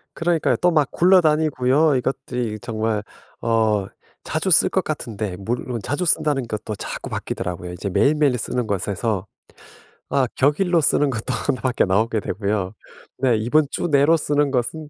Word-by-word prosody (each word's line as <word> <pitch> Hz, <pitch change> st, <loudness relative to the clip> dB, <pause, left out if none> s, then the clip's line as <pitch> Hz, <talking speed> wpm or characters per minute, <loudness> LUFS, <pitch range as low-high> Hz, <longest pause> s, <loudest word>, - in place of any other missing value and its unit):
그러니까요. 165 Hz, -1 st, +1 dB
또 180 Hz, 0 st, +2 dB
막 150 Hz, -4 st, +2 dB
굴러다니고요. 155 Hz, -5 st, +3 dB
이것들이 125 Hz, -4 st, -3 dB
정말 110 Hz, -2 st, -2 dB, 0.4 s
어 110 Hz, -3 st, +1 dB, 0.4 s
자주 -, -, -2 dB
쓸 -, -, +5 dB
것 -, -, 0 dB
같은데 105 Hz, -4 st, -4 dB
물론 120 Hz, +4 st, -3 dB
자주 145 Hz, -, -2 dB
쓴다는 150 Hz, -6 st, +1 dB
것도 110 Hz, -1 st, -5 dB
자꾸 -, -, -6 dB
바뀌더라고요. 90 Hz, 0 st, -4 dB
이제 100 Hz, +3 st, -4 dB
매일매일 140 Hz, +6 st, +2 dB
쓰는 120 Hz, +1 st, -2 dB
것에서 100 Hz, +1 st, -2 dB, 0.8 s
아 130 Hz, -2 st, +2 dB
격일로 165 Hz, +5 st, +2 dB
쓰는 145 Hz, -1 st, +2 dB
것도 120 Hz, +1 st, -3 dB
하나밖에 130 Hz, -2 st, +1 dB
나오게 110 Hz, +4 st, +1 dB
되고요. 100 Hz, -1 st, -2 dB, 0.5 s
네 125 Hz, -2 st, +3 dB
이번 125 Hz, +8 st, +2 dB
주 -, -, -2 dB
내로 145 Hz, +1 st, +4 dB
쓰는 145 Hz, -2 st, 0 dB
것은 145 Hz, +5 st, -2 dB
125 Hz, 335 characters per minute, -22 LUFS, 110-150 Hz, 0.8 s, 쓸